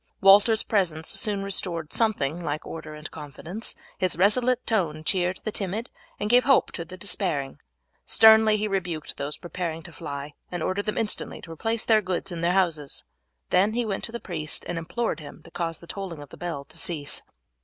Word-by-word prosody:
Walter's 205 Hz, +3 st, +6 dB
presence 170 Hz, -7 st, 0 dB
soon 205 Hz, -2 st, +2 dB
restored 175 Hz, -5 st, 0 dB
something 175 Hz, -8 st, +1 dB
like 150 Hz, -1 st, -3 dB
order 155 Hz, -1 st, -7 dB
and 150 Hz, +1 st, -8 dB
confidence; 160 Hz, -, -5 dB, 0.2 s
his 185 Hz, -3 st, +1 dB
resolute 245 Hz, +6 st, +3 dB
tone 165 Hz, -9 st, 0 dB
cheered 180 Hz, +2 st, 0 dB
the 215 Hz, -, -2 dB
timid 205 Hz, +4 st, -3 dB, 0.3 s
and 205 Hz, -, -1 dB
gave 245 Hz, +3 st, +6 dB
hope 275 Hz, -1 st, +4 dB
to 170 Hz, -, -5 dB
the 180 Hz, +3 st, -10 dB
despairing. 175 Hz, -9 st, -1 dB, 0.4 s
Sternly 220 Hz, -1 st, +7 dB
he 215 Hz, +1 st, 0 dB
rebuked 180 Hz, -6 st, -3 dB
those 140 Hz, +1 st, -3 dB
preparing 170 Hz, -2 st, -4 dB
to 175 Hz, -, -11 dB
fly, 145 Hz, -1 st, -6 dB, 0.2 s
and 175 Hz, -3 st, -3 dB
ordered 200 Hz, +2 st, -1 dB
them 210 Hz, -, -1 dB
instantly 220 Hz, -2 st, -1 dB
to 165 Hz, -, -10 dB
replace 225 Hz, +7 st, -1 dB
their 220 Hz, -1 st, +5 dB
goods 185 Hz, 0 st, -2 dB
in 170 Hz, -1 st, -4 dB
their 170 Hz, +1 st, +2 dB
houses. 165 Hz, -7 st, +1 dB, 0.5 s
Then 200 Hz, +4 st, +4 dB
he 240 Hz, 0 st, 0 dB
went 200 Hz, -3 st, -2 dB
to -, -, -6 dB
the 235 Hz, -, -4 dB
priest 155 Hz, -7 st, -2 dB
and 175 Hz, -1 st, -2 dB
implored 170 Hz, +2 st, -2 dB
him 155 Hz, +1 st, -11 dB
to 170 Hz, -, -15 dB
cause 165 Hz, -2 st, -2 dB
the -, -, -14 dB
tolling 180 Hz, -4 st, -6 dB
of 145 Hz, -, -14 dB
the -, -, -11 dB
bell 170 Hz, -6 st, -4 dB
to 160 Hz, +3 st, -9 dB
cease. 150 Hz, -4 st, -1 dB
180 Hz, 195 wpm, -26 LUFS, 160-210 Hz, 0.5 s, Sternly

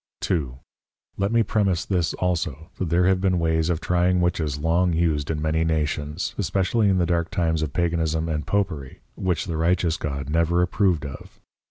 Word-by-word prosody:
2. 70 Hz, -8 st, -1 dB, 0.6 s
Let 100 Hz, +2 st, 0 dB
me 115 Hz, 0 st, +4 dB
premise 100 Hz, -5 st, 0 dB
this 90 Hz, -4 st, 0 dB
also, 85 Hz, -2 st, -2 dB
that 95 Hz, -, -1 dB
there 85 Hz, +2 st, +3 dB
have 95 Hz, 0 st, +3 dB
been 95 Hz, -2 st, +2 dB
ways 80 Hz, -1 st, +1 dB
of 85 Hz, -3 st, 0 dB
trying 90 Hz, +1 st, +2 dB
Witches 80 Hz, -5 st, 0 dB
long 85 Hz, +4 st, +1 dB
used 80 Hz, -3 st, 0 dB
in 80 Hz, -2 st, -1 dB
many 80 Hz, +1 st, +1 dB
Nations, 75 Hz, +1 st, -1 dB
especially 100 Hz, +3 st, +1 dB
in 95 Hz, -, +3 dB
the 90 Hz, -, +2 dB
dark 85 Hz, -1 st, 0 dB
times 80 Hz, -5 st, 0 dB
of 75 Hz, -3 st, -2 dB
Paganism 80 Hz, -1 st, 0 dB
and 75 Hz, -2 st, -3 dB
Popery, 85 Hz, -10 st, -2 dB
which 90 Hz, -4 st, -1 dB
the 85 Hz, -5 st, -3 dB
righteous 85 Hz, 0 st, +1 dB
God 70 Hz, -3 st, -4 dB
never 85 Hz, +3 st, +2 dB
approved 90 Hz, -4 st, +1 dB
of. 70 Hz, -, -10 dB
85 Hz, 180 wpm, -24 LUFS, 80-90 Hz, 0.6 s, me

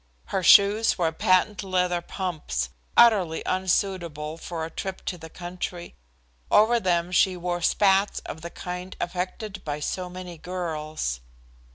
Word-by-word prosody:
Her 190 Hz, -, +1 dB
shoes 205 Hz, +4 st, +6 dB
were 165 Hz, -3 st, +1 dB
patent 185 Hz, +5 st, +2 dB
leather 180 Hz, -2 st, 0 dB
pumps, 155 Hz, -, -3 dB, 0.3 s
utterly 195 Hz, -9 st, +5 dB
unsuitable 180 Hz, -5 st, -1 dB
for 165 Hz, -2 st, -4 dB
a 165 Hz, -, -8 dB
trip 190 Hz, +3 st, -6 dB
to -, -, -2 dB
the 160 Hz, -, -10 dB
country. 175 Hz, 0 st, -6 dB, 0.6 s
Over 230 Hz, +3 st, +5 dB
them 175 Hz, -3 st, 0 dB
she 185 Hz, 0 st, +3 dB
wore 175 Hz, 0 st, -2 dB
spats 195 Hz, +3 st, +3 dB
of 160 Hz, -, -8 dB
the 170 Hz, -, -6 dB
kind 180 Hz, +1 st, -7 dB
affected 185 Hz, +3 st, -4 dB
by 150 Hz, -1 st, -3 dB
so 180 Hz, +4 st, -3 dB
many 180 Hz, -2 st, -8 dB
girls. 155 Hz, -, -3 dB
180 Hz, 140 wpm, -25 LUFS, 165-190 Hz, 0.6 s, shoes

